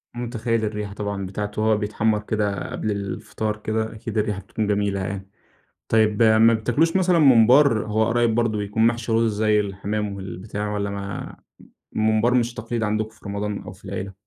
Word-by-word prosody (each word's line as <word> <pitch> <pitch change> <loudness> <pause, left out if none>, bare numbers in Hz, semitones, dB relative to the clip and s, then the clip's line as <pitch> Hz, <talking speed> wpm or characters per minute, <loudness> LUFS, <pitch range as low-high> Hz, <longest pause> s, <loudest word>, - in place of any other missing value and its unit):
متخيل 115 -2 -1
الريحة 105 -1 -4
طبعًا 100 -1 -4
بتاعته 105 +2 -4
وهو 110 -1 +3
بيتحمر 105 +1 0
كده 105 -3 -2
قبل 110 - -2
الفطار 105 +2 -3
كده، 110 +1 -2
أكيد 110 0 -6
الريحة 105 -2 0
بتكون 105 +2 -3
جميلة 100 -1 0
يعني. 95 +1 -5 0.6
طيب 110 0 +3
ما 110 +1 +6
بتاكلوش 145 +11 +1
مثلًا 180 -2 +3
ممبار، 125 -3 +5
هو 110 +1 +1
قريب 120 -1 +2
برضو 115 -3 +1
بيكون 105 +2 +1
محشي 115 -1 0
رز 115 -1 +2
زي 105 -1 +3
الحمام 100 +1 -3
والبتاع، 100 +2 -5
والَّا 100 -1 -2
ما 100 -1 -6 0.6
الممبار 110 +3 +2
مش 120 -1 +1
تقليد 115 0 -3
عندكم 110 +1 -1
في 110 0 -23
رمضان 100 0 -3
أو - - -8
في - - -19
العيلة؟ 95 +1 -5
110 Hz, 170 wpm, -23 LUFS, 100-115 Hz, 0.6 s, ما